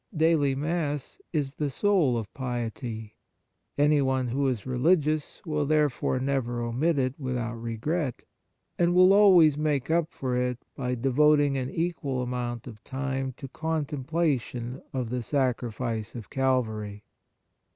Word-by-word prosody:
Daily 155 Hz, -4 st, +3 dB
Mass 150 Hz, -, -2 dB
is 145 Hz, -4 st, -1 dB
the 145 Hz, -1 st, -2 dB
soul 160 Hz, -, +2 dB
of 110 Hz, -3 st, -5 dB
piety. 120 Hz, -3 st, -5 dB, 0.6 s
Anyone 135 Hz, -3 st, +2 dB
who 135 Hz, +3 st, 0 dB
is 120 Hz, -6 st, -2 dB
religious 150 Hz, +3 st, +1 dB
will 150 Hz, -3 st, -1 dB
therefore 150 Hz, -4 st, +1 dB
never 130 Hz, -3 st, -1 dB
omit 130 Hz, +8 st, 0 dB
it 130 Hz, -1 st, +1 dB
without 120 Hz, -4 st, -3 dB
regret, 125 Hz, +5 st, -2 dB, 0.6 s
and 175 Hz, 0 st, +3 dB
will 185 Hz, +1 st, +7 dB
always 180 Hz, -8 st, +6 dB
make 150 Hz, -2 st, 0 dB
up 165 Hz, -1 st, +1 dB
for 130 Hz, -2 st, -3 dB
it 125 Hz, -1 st, 0 dB, 0.2 s
by 125 Hz, -1 st, -2 dB
devoting 145 Hz, +3 st, +3 dB
an 130 Hz, -1 st, -2 dB
equal 145 Hz, -7 st, -2 dB
amount 120 Hz, -1 st, -3 dB
of 110 Hz, -4 st, -11 dB
time 135 Hz, -1 st, -3 dB
to 135 Hz, -, -7 dB
contemplation 145 Hz, -4 st, -2 dB
of 125 Hz, -3 st, -3 dB
the 125 Hz, 0 st, -1 dB
Sacrifice 120 Hz, -3 st, -2 dB
of 115 Hz, -3 st, -8 dB
Calvary. 110 Hz, -6 st, -1 dB
135 Hz, 130 wpm, -27 LUFS, 125-150 Hz, 0.6 s, will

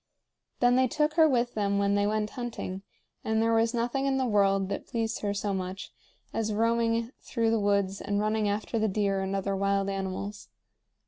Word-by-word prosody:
Then 245 Hz, 0 st, +5 dB
they 260 Hz, 0 st, +4 dB
took 300 Hz, +4 st, 0 dB
her 320 Hz, -1 st, +5 dB
with 245 Hz, -2 st, +1 dB
them 200 Hz, -2 st, 0 dB
when 200 Hz, 0 st, +2 dB
they 205 Hz, 0 st, +2 dB
went 210 Hz, 0 st, -1 dB
hunting, 230 Hz, -6 st, -5 dB, 0.4 s
and 220 Hz, 0 st, 0 dB
there 225 Hz, 0 st, +2 dB
was 225 Hz, 0 st, +3 dB
nothing 245 Hz, +3 st, -1 dB
in 270 Hz, -1 st, +1 dB
the 260 Hz, -, +1 dB
world 195 Hz, -3 st, +2 dB
that 200 Hz, -, -4 dB
pleased 225 Hz, -1 st, -2 dB
her 205 Hz, -, 0 dB
so 200 Hz, 0 st, -2 dB
much 185 Hz, 0 st, -5 dB, 0.4 s
as 220 Hz, -1 st, -1 dB
roaming 230 Hz, +1 st, +1 dB
through 230 Hz, -2 st, 0 dB
the 225 Hz, -, +2 dB
woods 200 Hz, -1 st, +1 dB
and 205 Hz, 0 st, -1 dB
running 215 Hz, 0 st, +1 dB
after 215 Hz, +3 st, -2 dB
the 220 Hz, -, +2 dB
deer 195 Hz, -1 st, 0 dB
and 190 Hz, +1 st, -2 dB
other 195 Hz, 0 st, -1 dB
wild 195 Hz, 0 st, +1 dB
animals. 195 Hz, +1 st, -5 dB
210 Hz, 195 wpm, -28 LUFS, 200-230 Hz, 0.4 s, Then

